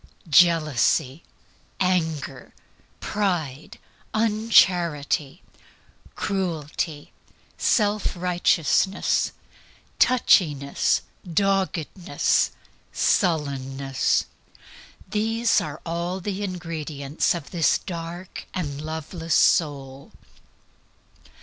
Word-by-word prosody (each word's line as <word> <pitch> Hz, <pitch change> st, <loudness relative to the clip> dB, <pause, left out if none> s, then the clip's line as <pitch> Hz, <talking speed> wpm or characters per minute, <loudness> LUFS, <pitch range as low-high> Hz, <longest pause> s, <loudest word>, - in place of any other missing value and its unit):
Jealousy, 155 Hz, -3 st, +3 dB, 0.6 s
anger, 160 Hz, -7 st, -1 dB, 0.4 s
pride, 165 Hz, -9 st, -2 dB, 0.4 s
uncharity, 180 Hz, -9 st, +2 dB, 0.7 s
cruelty, 160 Hz, -5 st, -3 dB, 0.4 s
self 210 Hz, -3 st, +1 dB
righteousness, 180 Hz, 0 st, +1 dB, 0.7 s
touchiness, 150 Hz, -, +3 dB, 0.3 s
doggedness, 190 Hz, -1 st, +1 dB, 0.4 s
sullenness 135 Hz, -6 st, 0 dB, 0.8 s
these 225 Hz, +4 st, +1 dB
are 150 Hz, -1 st, -6 dB, 0.4 s
the 195 Hz, +1 st, -4 dB
ingredients 160 Hz, -6 st, -2 dB
of 165 Hz, -4 st, -8 dB
this 165 Hz, -5 st, +3 dB
dark 170 Hz, +1 st, -7 dB
and 145 Hz, -5 st, -3 dB
loveless 160 Hz, +1 st, -3 dB
soul. 140 Hz, -5 st, +1 dB
165 Hz, 55 wpm, -24 LUFS, 145-190 Hz, 0.8 s, Jealousy